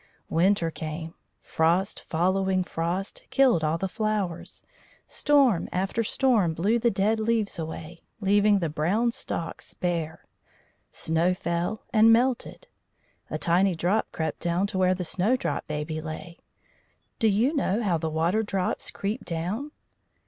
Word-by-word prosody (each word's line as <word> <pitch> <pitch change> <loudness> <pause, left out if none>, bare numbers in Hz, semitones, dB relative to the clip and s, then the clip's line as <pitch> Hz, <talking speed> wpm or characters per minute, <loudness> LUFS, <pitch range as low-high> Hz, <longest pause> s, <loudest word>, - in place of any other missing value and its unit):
Winter 170 0 +2
came. 160 +1 -6 0.3
Frost 170 +4 +1
following 185 +2 +1
frost 175 +3 -3
killed 255 - +4
all 155 +1 +1
the 190 - -2
flowers; 210 -4 -3 0.4
storm 275 - +2
after 195 +5 -1
storm 215 - +2
blew 210 +8 +2
the 235 +1 +3
dead 210 +2 +1
leaves 220 -4 0
away, 160 +1 -6 0.2
leaving 205 +1 +4
the 170 -4 0
brown 185 +11 +1
stalks 230 -9 -4
bare. 165 -3 -3 0.7
Snow 165 +3 +1
fell, 175 +4 -2
and 225 0 +6
melted. 245 +2 +1 0.6
A - - -2
tiny 180 +2 +2
drop 180 +7 0
crept 160 -2 -3
down 175 +2 0
to 200 -2 -3
where 185 0 +3
the 180 -1 -4
Snowdrop 210 +10 0
Baby 155 +1 -3
lay. 160 +2 -8 0.8
Do 225 - +3
you 225 +9 +2
know 230 -5 0
how 175 -6 +1
the 160 0 -2
water 165 +7 +1
drops 195 -4 -2
creep 210 +5 -4
down? 180 - -3
185 Hz, 135 wpm, -26 LUFS, 165-215 Hz, 0.8 s, and